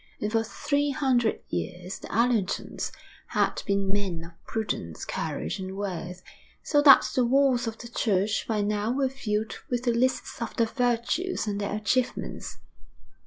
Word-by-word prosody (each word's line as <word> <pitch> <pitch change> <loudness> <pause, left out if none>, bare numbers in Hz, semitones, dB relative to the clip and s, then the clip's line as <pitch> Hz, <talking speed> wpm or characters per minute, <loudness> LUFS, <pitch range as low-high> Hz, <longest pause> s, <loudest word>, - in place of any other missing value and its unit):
And 210 - -2
for 225 0 +3
three 285 +5 0
hundred 255 -5 +1
years 175 - -4
the - - -9
Allertons 230 -4 0 0.4
had - - +1
been 200 -1 +1
men 190 -5 -1
of 165 0 -17
prudence, 145 - -3
courage, 80 - -3
and 190 0 -5
worth, 180 -2 -4 0.4
so 290 - +3
that 280 -2 +8
the 255 - +3
walls 255 -1 +3
of 225 0 -4
the 235 - -8
church 210 -3 0
by 215 -2 +1
now 210 +1 0
were 265 +1 +1
filled 220 -5 -2 0.2
with 245 -1 -1
the 240 -2 +2
lists 255 +1 0
of 230 - -3
their 230 - +3
virtues 245 +10 0
and 205 -1 -2
their 200 0 -1
achievements. 235 +4 -1
225 Hz, 160 wpm, -27 LUFS, 200-250 Hz, 0.4 s, that